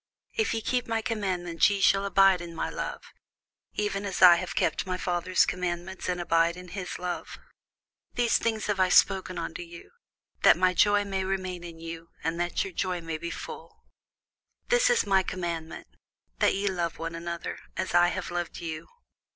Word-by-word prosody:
If 440 - 0
ye 225 - -2
keep 250 +2 -1
my 225 -1 -1
commandments, 185 -7 +1
ye 200 -1 -1
shall 195 +1 +4
abide 195 -2 +5
in 170 -1 -8
my - - -2
love; - - -5 0.7
even 205 -1 -1
as 200 -2 -3
I 180 -2 +9
have 180 +1 -5
kept - - 0
my 185 0 -1
Father's 180 0 +1
commandments, 180 +1 -3
and 180 -1 -1
abide 170 0 +2
in 180 0 -10
his 180 0 -5
love. 180 -1 -5 0.8
These 240 -1 +3
things 220 -2 -1
have 205 -2 -1
I 185 -1 +4
spoken 190 0 +3
unto 165 0 -4
you, 170 0 -11 0.5
that - - +7
my 185 0 +3
joy 205 +3 +4
might 195 -1 -2
remain 185 -2 -3
in 170 -1 -9
you, 165 0 -8
and 165 +2 -1
that 175 0 0
your 190 - -7
joy 185 0 -1
might 165 -1 -5
be 170 - -3
full. - - -9 0.8
This - - +4
is 485 - +3
my 195 -1 +4
commandment, 170 -3 -5 0.5
That - - +3
ye 200 +1 -1
love 175 -4 -1
one 165 0 -4
another, 170 0 -5 0.2
as - - -2
I 175 0 +6
have 175 - -3
loved 175 -1 -3
you. 160 -2 -6
180 Hz, 185 wpm, -28 LUFS, 170-195 Hz, 0.8 s, I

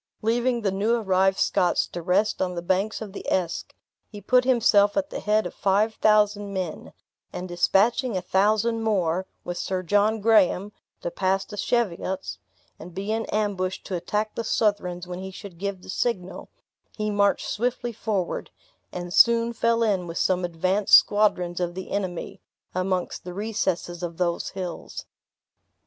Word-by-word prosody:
Leaving 240 +2 +1
the 200 -3 0
new 210 +5 +1
arrived 190 -3 +2
Scots 180 -3 +2
to 175 - -7
rest 195 +5 +1
on 180 -1 -1
the 170 - -4
banks 195 +5 0
of 200 -3 -10
the - - -7
Esk, 180 -3 -1 0.4
he 205 - -9
put 250 +4 +3
himself 210 -4 +4
at 290 0 0
the - - -4
head 215 +1 +1
of - - -5
five 205 +3 +1
thousand 210 -1 +3
men; 185 -4 -4 0.4
and 180 - -5
dispatching 200 +6 +2
a - - -2
thousand 215 +4 +2
more, 190 -4 0 0.2
with 175 0 -5
Sir 185 -1 -2
John 205 +4 +2
Graham, 205 -2 +3 0.3
to 175 - -3
pass 190 +2 0
the 210 - -9
Cheviots, 190 -3 -2 0.4
and 175 0 -11
be 200 +3 -3
in 225 0 -1
ambush 195 -3 -1
to 190 - -4
attack 210 +5 -2
the 230 - -3
Southrons 190 -5 0
when 180 0 -6
he 190 0 -6
should 190 -2 -11
give 200 -1 -4
the - - -13
signal, 185 -7 -3 0.5
he 215 -1 -1
marched 200 -1 +2
swiftly 240 +1 -2
forward, 205 -5 -2 0.4
and 175 0 -6
soon 235 +2 +5
fell 230 0 +2
in 195 -5 0
with 165 - -6
some 185 -1 +1
advanced 185 +4 +3
squadrons 180 -4 +3
of 175 -1 -2
the 190 0 -7
enemy, 185 -4 -4 0.3
amongst 185 0 -2
the 180 0 -8
recesses 190 -5 -2
of 170 -2 -5
those 170 -1 -1
hills. 185 -3 -6
195 Hz, 165 wpm, -25 LUFS, 180-215 Hz, 0.5 s, soon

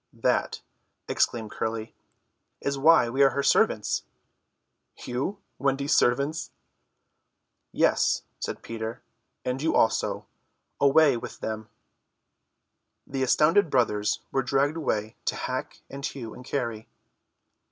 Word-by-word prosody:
"That," - - 0 0.5
explained 110 -3 0
Curly, 110 0 -3 0.7
"is 140 - -1
why 140 -2 +5
we 130 +4 0
are 135 - +7
her 140 +2 -2
servants." - - +2 1.0
"You? 130 +11 -2 0.2
Wendy's 140 +1 +1
servants!" 140 +6 +1 1.2
"Yes," - - +2 0.2
said - - -5
Peter, 115 0 -5 0.4
"and 125 +1 -2
you 160 - +1
also. 115 - +1 0.5
Away 140 -1 +5
with - - -8
them." 110 -1 -4 1.4
The 135 -1 -4
astounded 160 +8 +4
brothers 105 -6 +1
were 135 - +1
dragged 140 +4 +1
away 110 -9 -2
to - - 0
hack - - -4
and 140 0 -9
hew 125 -7 -5
and 125 - -11
carry. 115 -5 -3
135 Hz, 110 wpm, -27 LUFS, 115-140 Hz, 1.4 s, are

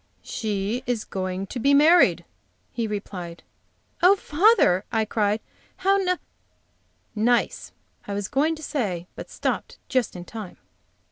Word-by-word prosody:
"She 210 +2 -2
is 240 -3 -1
going 185 0 -4
to 245 - -6
be 280 +4 +4
married," 290 - +5 0.5
he 230 -2 -2
replied. 185 -5 -6 0.6
"Oh, 365 +3 +7
father!" 330 - +3
I 220 -1 +1
cried, 210 0 0 0.4
"how 390 +1 +2
n 365 -1 +1 0.5
" - - -42 0.2
nice, 240 - 0 0.4
I 200 - -3
was 200 -1 -2
going 310 +4 +1
to 315 - -11
say, 200 - -2
but - - -8
stopped - - -3
just 255 -7 0
in 175 -1 -7
time. 215 -3 -8
220 Hz, 140 wpm, -24 LUFS, 195-295 Hz, 0.6 s, Oh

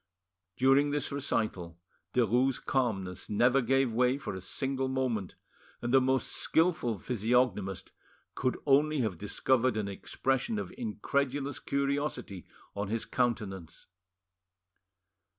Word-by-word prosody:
During 135 +3 +4
this 145 0 -1
recital 110 -11 -2 0.4
Derues' 125 +2 +3
calmness 95 -9 -2
never 125 +6 +3
gave 130 0 +2
way 125 +3 +3
for 135 - -5
a 95 - -6
single 135 +6 -2
moment, 130 -7 -2 0.4
and 120 +1 -3
the 135 - +7
most 130 0 +1
skilful 160 - +1
physiognomist 110 -3 0 0.4
could 130 - -1
only 150 +1 +3
have 100 -8 -2
discovered 120 +3 +1
an 105 -2 -1
expression 135 - -1
of - - -5
incredulous 145 - -2
curiosity 140 - -2 0.3
on 100 0 -2
his 115 +2 -2
countenance. 100 -9 -2
125 Hz, 115 wpm, -30 LUFS, 105-135 Hz, 0.4 s, the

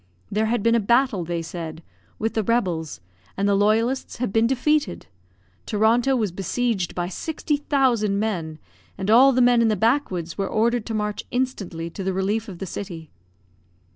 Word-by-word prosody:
There 215 +2 +1
had 230 -2 0
been 230 - +4
a 235 - +4
battle, 235 -2 +2
they 170 0 -3
said, 165 -1 -7 0.3
with 225 +1 -2
the 220 - +1
rebels, 180 - -1 0.4
and 200 +1 +1
the 200 - +3
loyalists 220 +6 +1
had 240 -5 -3
been 225 +1 +4
defeated; 295 +4 0 0.6
Toronto 230 +5 +3
was 215 -6 0
besieged 195 +1 -2
by 175 -1 -1
sixty 295 - -2
thousand 250 -8 +1
men, 170 -8 -2 0.4
and 195 +2 -1
all 260 +4 +7
the 255 -1 +2
men 245 -1 +5
in 230 - +4
the 215 - +2
backwoods 200 - 0
were 195 - 0
ordered 230 +1 +1
to 225 - -3
march 210 -1 -2
instantly 195 -10 -3
to 195 - -6
the 190 0 -1
relief 205 +4 -1
of 185 - -8
the 195 - -5
city. 170 -4 -7
215 Hz, 175 wpm, -23 LUFS, 185-240 Hz, 0.6 s, all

